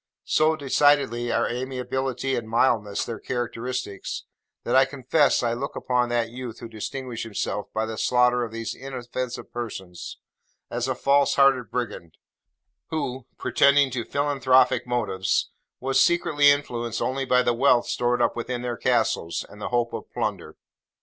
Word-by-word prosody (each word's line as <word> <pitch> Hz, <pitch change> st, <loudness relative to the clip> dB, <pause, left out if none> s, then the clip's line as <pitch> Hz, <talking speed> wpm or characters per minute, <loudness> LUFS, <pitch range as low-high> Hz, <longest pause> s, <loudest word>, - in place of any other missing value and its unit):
So 155 Hz, +1 st, +3 dB
decidedly 140 Hz, -4 st, +2 dB
are 115 Hz, -, +1 dB
amiability 130 Hz, +1 st, -2 dB
and 110 Hz, -2 st, -4 dB
mildness 110 Hz, -3 st, +1 dB
their 115 Hz, -, -5 dB
characteristics, 120 Hz, -4 st, -4 dB, 0.4 s
that 120 Hz, -, 0 dB
I 130 Hz, -, +7 dB
confess 135 Hz, +1 st, +2 dB
I 115 Hz, -1 st, +1 dB
look 135 Hz, +4 st, -4 dB
upon 125 Hz, -1 st, 0 dB
that 120 Hz, -1 st, 0 dB
youth 120 Hz, -2 st, -7 dB
who 115 Hz, -, -7 dB
distinguished 115 Hz, +2 st, -5 dB
himself 105 Hz, -1 st, -3 dB
by 110 Hz, 0 st, -1 dB
the 110 Hz, -1 st, -5 dB
slaughter 125 Hz, 0 st, +3 dB
of 115 Hz, -, -5 dB
these 115 Hz, 0 st, -4 dB
inoffensive 125 Hz, -1 st, -6 dB
persons, 95 Hz, -7 st, -6 dB, 0.5 s
as 120 Hz, +1 st, -1 dB
a 130 Hz, -, -1 dB
false 140 Hz, +2 st, +3 dB
hearted 135 Hz, -3 st, +4 dB
brigand, 105 Hz, -9 st, -5 dB, 0.7 s
who, 130 Hz, -5 st, -4 dB
pretending 140 Hz, -1 st, +4 dB
to 120 Hz, -2 st, -2 dB
philanthropic 130 Hz, -3 st, +2 dB
motives, 95 Hz, -6 st, 0 dB, 0.3 s
was 135 Hz, 0 st, +2 dB
secretly 150 Hz, -4 st, +4 dB
influenced 120 Hz, -5 st, 0 dB
only 135 Hz, +1 st, -1 dB
by 125 Hz, -1 st, +3 dB
the 120 Hz, -, +2 dB
wealth 120 Hz, 0 st, +4 dB
stored 120 Hz, 0 st, +1 dB
up -, -, +1 dB
within 120 Hz, +1 st, -4 dB
their 120 Hz, -1 st, -3 dB
castles, 115 Hz, -9 st, 0 dB
and 105 Hz, -, -13 dB
the -, -, -3 dB
hope 120 Hz, -1 st, 0 dB
of -, -, -7 dB
plunder. -, -, -3 dB
125 Hz, 150 wpm, -25 LUFS, 115-135 Hz, 0.7 s, I